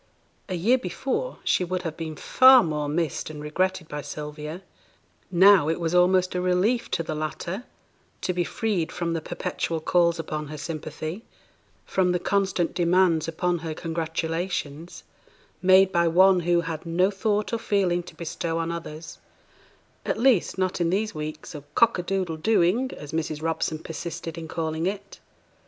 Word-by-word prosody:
A 185 - -2
year 230 +10 +3
before 270 - -3
she - - +2
would 180 +1 -3
have 160 -2 -4
been 160 -1 -5
far 260 - +7
more 150 -3 -2
missed 155 -1 -2
and 155 -1 -8
regretted 165 +3 -1
by 150 -1 -5
Sylvia; 150 +4 -7 0.7
now 185 -3 +6
it 165 - -1
was 165 0 -1
almost 185 +1 +4
a 180 - -1
relief 185 +7 +1
to 165 - -1
the 160 - -4
latter 155 - -4 0.6
to 180 - -1
be 175 0 0
freed 185 -5 -1
from 170 -1 -2
the 165 - -2
perpetual 165 +1 -3
calls 170 +1 +2
upon 155 -2 -4
her 155 +1 -7
sympathy, 155 +5 -5 0.6
from 180 -1 +1
the 180 - +1
constant 195 -3 0
demands 175 -2 +3
upon 175 +2 -1
her 160 -1 -5
congratulations, 165 -1 -3 0.6
made 190 +1 +6
by 170 -1 +3
one 185 +2 +5
who 175 0 +2
had 165 -2 -5
no 180 +4 +2
thought 210 +2 -1
or 230 - 0
feeling 195 -5 +1
to 175 - -13
bestow 165 0 -3
on 165 0 -1
others; 160 -1 -7 0.8
at - - -1
least, 235 -6 +3
not 185 -1 -1
in 170 - +2
these 210 +4 0
weeks 155 +1 -6
of 150 -2 -8
'cock 230 -5 +4
a - - +1
doodle 180 -3 -2
dooing,' 220 +6 +2
as 145 - -9
Mrs. 155 -1 -3
Robson 160 -1 -1
persisted 165 +1 -6
in 165 -1 -7
calling 160 +1 -2
it. 200 0 -5
170 Hz, 165 wpm, -25 LUFS, 160-190 Hz, 0.8 s, far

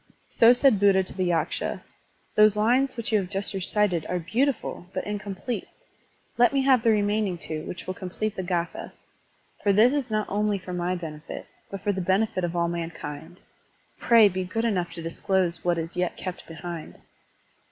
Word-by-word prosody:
So 230 +1 +6
said 250 -4 +4
Buddha 195 -1 +4
to 185 - -8
the 185 -1 0
Yaksha: 170 - -1 0.5
"Those 210 -1 +5
lines 245 +5 +2
which 230 -1 -2
you 215 - +4
have 185 -2 -4
just 200 +1 -1
recited 190 -2 +1
are 180 - -1
beautiful 225 - -1
but - - -2
incomplete. 205 +3 -4 0.7
Let 240 +2 +5
me 275 -1 +2
have 260 -3 +5
the 230 - +3
remaining 205 -3 +1
two, 155 -1 -6
which 175 - -6
will 185 - -3
complete 190 +3 -4
the - - -3
g^tha. 175 -2 -3 0.7
For 205 - +3
this 220 +6 +5
is 285 -5 -1
not 215 -1 0
only 210 0 0
for 180 -1 -8
my 180 0 -1
own - - -2
benefit, 155 -2 -7 0.2
but 195 -1 -6
for 205 +1 +1
the 190 -1 -2
benefit 190 +2 +1
of 175 0 -2
all 170 0 +1
mankind. 170 -1 -6 0.6
Pray 230 -3 +6
be 185 -1 -2
good 225 +6 -2
enough 185 -6 0
to 170 -1 -7
disclose 175 +1 0
what 175 -1 +1
is 165 +1 -4
yet 180 -1 -1
kept 185 -2 -6
behind. 170 0 -7
190 Hz, 185 wpm, -26 LUFS, 175-215 Hz, 0.7 s, So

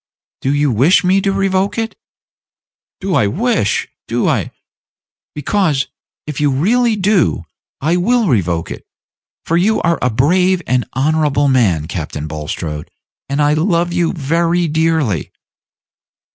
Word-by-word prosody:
"Do 135 - 0
you 145 -1 +1
wish 135 - +4
me 190 +2 +3
to 195 - +1
revoke 195 +1 0
it?" 225 0 -2 1.0
"Do 195 -1 -2
I 105 - +3
wish? 200 - 0 0.2
do - - 0
I - - 0 0.4
" - - -79
"Because, 150 -2 0 0.4
if 150 -1 -5
you 145 - +3
really 220 - +2
do, 195 - +1 0.4
I 160 +5 +1
will 230 +4 +2
revoke 90 - 0
it: - - -7 0.6
for 165 - +1
you 215 +5 +2
are 170 0 +1
a 125 - +2
brave 180 +9 +2
and 125 -1 0
honorable 145 +1 +1
man, 95 - +2
Captain 75 -3 -5
Bulstrode, 75 0 -5 0.4
and 140 +1 -1
I 145 +1 +3
love 170 +1 +1
you 175 -2 +1
very 170 +2 0
dearly." 155 - 0
160 Hz, 140 wpm, -16 LUFS, 130-185 Hz, 1.0 s, wish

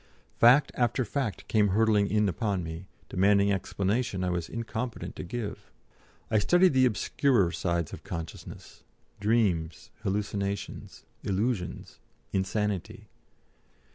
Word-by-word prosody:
Fact 130 +5 +6
after 120 +1 +1
fact 105 -5 -3
came 105 -2 +3
hurtling 105 0 +3
in 105 0 +2
upon 95 0 -1
me, 80 +3 -7 0.2
demanding 100 +1 +3
explanation 100 +1 -1
I 90 - 0
was 85 -2 -2
incompetent 115 +1 -4
to - - -5
give. 110 +3 -6 0.6
I 110 - +4
studied 175 - +4
the 130 -1 +5
obscurer 115 -3 +2
sides 85 -2 -1
of - - -8
consciousness, 80 -2 -8 0.4
dreams, 95 -7 0
hallucinations, 100 -1 -3 0.2
illusions, 100 -1 -2 0.3
insanity. 100 0 -2
100 Hz, 110 wpm, -28 LUFS, 95-115 Hz, 0.6 s, Fact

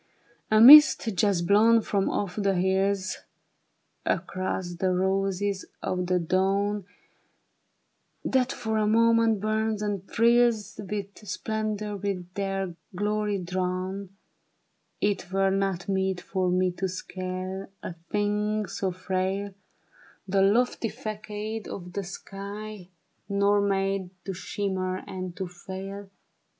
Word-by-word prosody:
" - - -35
A 215 - +6
mist 295 +2 +10
just 190 -2 +2
blown 220 +5 +5
from 200 -2 0
off 195 -3 -2
the 200 -2 +1
hills 190 +1 +1 0.9
Across 185 -1 -2
the 185 +1 +1
roses 195 +1 0 0.2
of 180 -1 -1
the 180 0 +2
dawn. 195 +3 +1 1.4
That 260 0 +2
for 220 -1 -2
a 210 - +2
moment 230 0 +4
burns 215 0 0
and 200 -2 -3
thrills, 235 -2 +2
With 200 -1 -4
splendor 210 +1 -3
from 190 -3 -3
their 195 -2 -2 0.2
glory 210 +1 0
drawn; 185 +2 -3 0.8
It 200 -3 0
were 195 0 +2
not 195 -2 -1
meet 190 -1 0
for 185 -1 -1
me 185 0 +2
to 190 - 0
scale 185 +1 -5
— - - -41
A - - -5 0.2
thing 210 +1 0
so 190 -1 -2
frail 190 +2 -2 0.4
— - - -28
The 195 +1 +2
lofty 225 +3 +2
fagade 215 +1 -5
of 180 -2 -7
the 200 - -2
sky, 200 +1 -8 0.4
Nor 200 +1 +3
made 195 -1 0 0.2
to 195 - -3
shimmer 185 0 -3
and 185 -2 -6
to 190 - -2
fail. 190 +3 -8
195 Hz, 125 wpm, -27 LUFS, 185-210 Hz, 1.4 s, mist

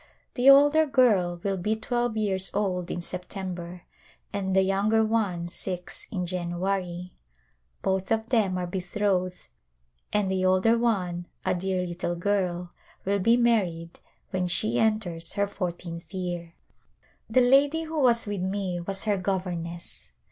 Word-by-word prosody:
The 255 +2 +5
older 290 +3 +7
girl 205 -11 +3
will 195 -1 0
be 210 +5 0
twelve 240 0 -1
years 195 -3 +1
old 185 -3 -1
in 175 - -3
September 180 -1 -6 0.5
and 190 -2 -1
the 190 - +5
younger 205 +3 +2
one 200 -6 0
six 180 0 -6
in 180 -4 -2
January. 180 0 -3 0.7
Both 190 0 0
of 225 +1 0
them 205 -7 +2
are 180 - -2
betrothed 185 0 -1 0.7
and 205 -2 +1
the 190 -1 0
older 185 +5 +4
one, 185 -7 0 0.2
a 185 - +2
dear 185 0 -1
little 175 0 -3
girl, 180 -2 -1 0.3
will 200 +1 +1
be 230 +5 +4
married 185 -9 +1 0.3
when 185 -1 0
she 120 -8 0
enters 180 -7 0
her 200 - +1
fourteenth 175 -3 -5
year. 175 -2 -4 0.7
The 255 +3 +4
lady 280 +6 +4
who 320 -1 -3
was 235 -3 +4
with 205 -3 -3
me 190 -1 -2
was 195 +2 -3
her 210 -2 +1
governess. 180 -3 -4
190 Hz, 140 wpm, -27 LUFS, 175-215 Hz, 0.7 s, older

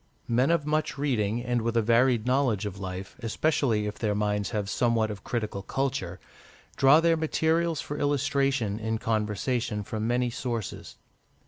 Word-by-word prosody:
Men 125 +4 +2
of 165 -3 +2
much 155 -1 -1
reading, 120 -5 0
and 120 -1 0
with 115 +1 -1
a - - +5
varied 120 0 +3
knowledge 125 -5 +1
of 100 -1 -5
life, 95 0 -6
especially 115 -2 0
if 105 - -5
their 105 -3 0
minds 105 -1 0
have 105 -2 -2
somewhat 115 0 +1
of 100 -2 -8
critical 110 -5 -3
culture, 100 -7 -2 0.6
draw 135 +3 +6
their 165 0 +4
materials 160 +1 +1
for 145 - -5
illustration 135 -6 +1
in 110 0 -1
conversation 110 0 -1
from 110 +2 -3
many 120 0 +1
sources. 115 -3 -5
115 Hz, 155 wpm, -27 LUFS, 105-135 Hz, 0.6 s, draw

